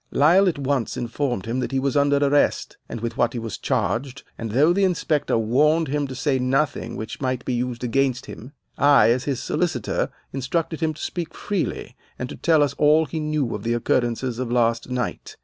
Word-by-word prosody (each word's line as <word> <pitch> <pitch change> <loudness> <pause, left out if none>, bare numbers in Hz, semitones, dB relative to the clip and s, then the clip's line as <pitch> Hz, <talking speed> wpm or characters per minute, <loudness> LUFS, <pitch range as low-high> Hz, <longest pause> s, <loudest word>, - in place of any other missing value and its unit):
Lyle 180 +7 +5
at 165 - -4
once 135 -3 -1
informed 120 -3 -2
him 115 +3 -2
that 130 - -2
he 135 - 0
was 135 -1 -1
under 145 0 +3
arrest, 145 0 +1
and 115 - -6
with 115 0 -4
what 120 -1 +2
he - - -4
was 115 -3 -5
charged, 130 +2 -1
and 115 - -5
though 145 +10 +4
the 200 +2 +1
inspector 165 -8 +1
warned 150 +8 +2
him 145 0 -1
to 130 - -7
say 135 0 0
nothing 135 +4 0
which 110 +4 -6
might 130 -2 -2
be 125 - -1
used 120 0 -3
against 130 +1 0
him, 125 +5 -10 0.3
I, 140 -4 +6
as 125 +2 0
his 135 -3 -1
solicitor, 160 -10 -1 0.2
instructed 155 +5 -2
him 160 -1 -1
to - - -10
speak 170 -3 -4
freely 200 -4 -3 0.2
and 125 - -4
to - - -7
tell 160 -3 +3
us 145 - 0
all 155 +2 +5
he 155 +3 -4
knew 150 -5 -1
of - - -4
the 115 - -1
occurrences 120 +1 0
of 125 -2 -3
last 115 0 +1
night. 125 0 -4
135 Hz, 205 wpm, -23 LUFS, 120-150 Hz, 0.3 s, I